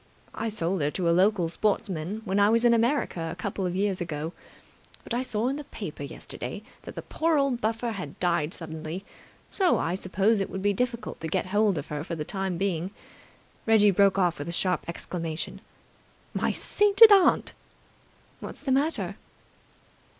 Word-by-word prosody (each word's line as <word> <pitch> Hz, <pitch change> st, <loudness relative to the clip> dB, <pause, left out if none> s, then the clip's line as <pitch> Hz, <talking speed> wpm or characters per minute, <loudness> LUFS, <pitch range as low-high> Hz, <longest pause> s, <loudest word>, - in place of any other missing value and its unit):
I 225 Hz, 0 st, -2 dB
sold 190 Hz, -4 st, -1 dB
her 145 Hz, -, +2 dB
to 175 Hz, +3 st, -2 dB
a -, -, +4 dB
local 185 Hz, 0 st, +3 dB
sportsman 195 Hz, +1 st, -2 dB
when 195 Hz, 0 st, +1 dB
I 205 Hz, +1 st, +5 dB
was 230 Hz, +2 st, +3 dB
in 235 Hz, -, +6 dB
America 230 Hz, -, +1 dB
a -, -, -6 dB
couple 190 Hz, 0 st, -3 dB
of 180 Hz, -, -3 dB
years 195 Hz, -1 st, 0 dB
ago. 160 Hz, 0 st, -4 dB, 0.7 s
But -, -, -6 dB
I 240 Hz, -, +1 dB
saw 235 Hz, -2 st, -1 dB
in 275 Hz, +2 st, -1 dB
the 295 Hz, -, -6 dB
paper -, -, -7 dB
yesterday -, -, -7 dB, 0.2 s
that -, -, -10 dB
the -, -, -6 dB
poor 320 Hz, -1 st, +1 dB
old 275 Hz, -4 st, +1 dB
buffer 225 Hz, +1 st, -1 dB
had 180 Hz, -10 st, -7 dB
died 170 Hz, -3 st, +1 dB
suddenly, 160 Hz, +3 st, -6 dB, 0.5 s
so 375 Hz, -3 st, +3 dB
I 165 Hz, -, -1 dB
suppose 195 Hz, +3 st, +1 dB
it 195 Hz, -, -2 dB
would 190 Hz, -, -5 dB
be 205 Hz, 0 st, +3 dB
difficult 240 Hz, +2 st, -3 dB
to 165 Hz, -, -4 dB
get -, -, 0 dB
hold 205 Hz, -1 st, +2 dB
of 140 Hz, -, -5 dB
her 150 Hz, 0 st, -3 dB
for 170 Hz, 0 st, -4 dB
the 150 Hz, -2 st, -4 dB
time 190 Hz, -2 st, -2 dB
being." 185 Hz, -2 st, -1 dB, 0.8 s
Reggie 210 Hz, -2 st, +6 dB
broke 195 Hz, +1 st, +4 dB
off 175 Hz, -4 st, +2 dB
with 145 Hz, -, -4 dB
a -, -, -2 dB
sharp 180 Hz, +1 st, 0 dB
exclamation. 165 Hz, -1 st, -5 dB, 0.7 s
"My -, -, 0 dB
sainted 415 Hz, +2 st, +6 dB
aunt!" 390 Hz, -3 st, +5 dB, 0.9 s
"What's -, -, -8 dB
the 275 Hz, -, -2 dB
matter?" 290 Hz, +5 st, 0 dB
195 Hz, 180 wpm, -27 LUFS, 170-230 Hz, 0.9 s, in